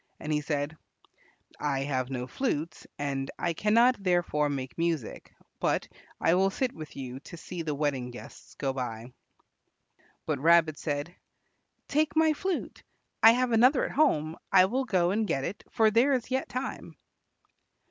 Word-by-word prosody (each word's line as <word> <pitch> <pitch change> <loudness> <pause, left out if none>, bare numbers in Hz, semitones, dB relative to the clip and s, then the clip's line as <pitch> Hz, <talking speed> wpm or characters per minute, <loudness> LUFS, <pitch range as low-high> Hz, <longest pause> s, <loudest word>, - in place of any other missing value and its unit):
And 155 0 -3
he 150 - +1
said, 145 0 -2 0.8
"I 140 -2 -1
have 130 -2 -1
no 125 -2 -3
flute, 160 - -3
and 135 -1 -2
I 170 - -1
cannot 230 +6 +3
therefore 175 -5 +1
make 135 -2 -4
music; 165 -7 -2 0.3
but - - 0 0.3
I 165 - +3
will 190 +2 +3
sit 250 +5 -1
with 155 -2 -10
you 130 -1 -6
to 170 - -11
see 175 +1 -6
the 155 -3 -2
wedding 140 -4 -1
guests 120 - -12
go 135 -2 -2
by." 120 -2 -5 1.1
But - - -1
Rabbit 165 0 +4
said, 145 +2 -3 0.7
"Take 300 +1 +1
my 315 0 +4
flute. 375 +3 -3 0.4
I 225 +1 +9
have 250 0 +1
another 250 +4 +4
at - - -4
home. 160 - +2
I 185 -1 +7
will 255 +7 -1
go 185 -6 +2
and 215 +2 0
get 135 - -1
it, 190 - -5
for 220 -3 +3
there 245 +6 +4
is 255 -1 -2
yet 260 +1 -1
time." 255 +2 -5
165 Hz, 160 wpm, -28 LUFS, 145-230 Hz, 1.1 s, I